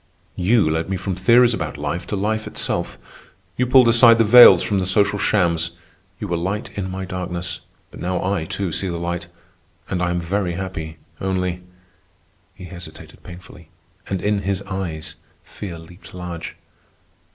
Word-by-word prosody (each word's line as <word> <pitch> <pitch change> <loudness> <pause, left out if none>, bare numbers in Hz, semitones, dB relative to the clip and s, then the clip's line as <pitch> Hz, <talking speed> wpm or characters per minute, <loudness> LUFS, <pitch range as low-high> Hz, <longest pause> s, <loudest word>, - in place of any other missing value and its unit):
You 100 +1 +3
led 80 +2 -1
me 95 - -1
from 95 +2 -3
theories 120 +6 +4
about 115 - -4
life 75 +4 -4
to - - -3
life 110 +2 -1
itself. - - -3 0.6
You 125 - 0
pulled 125 -1 +6
aside 115 0 +7
the 115 - +4
veils 120 +3 +9
from 100 -2 0
the 95 - -1
social 100 +1 +2
shams. 85 -5 +1 0.5
You - - -4
were 85 - -1
light 95 +6 -3
in 95 -2 -3
my 95 0 -5
darkness, 90 -1 -4 0.3
but - - -12
now 90 0 -2
I, 95 -4 -1
too, 95 +2 -3
see 95 - -1
the 85 -2 -3
light. 85 0 -4 0.6
And 90 -2 -2
I 90 - +1
am 90 0 -1
very 90 +1 -2
happy, 85 -3 -6 0.2
only.. 90 -1 -2 0.5
." - - -40
he 90 - -10
hesitated 85 -3 -12
painfully, 85 -2 -13 0.4
and 95 -2 -3
in 105 0 +1
his 100 0 -2
eyes 95 -5 -5 0.3
fear 90 -5 -8
leaped 85 +3 -14
large. 85 -2 -7
95 Hz, 170 wpm, -21 LUFS, 85-100 Hz, 0.6 s, veils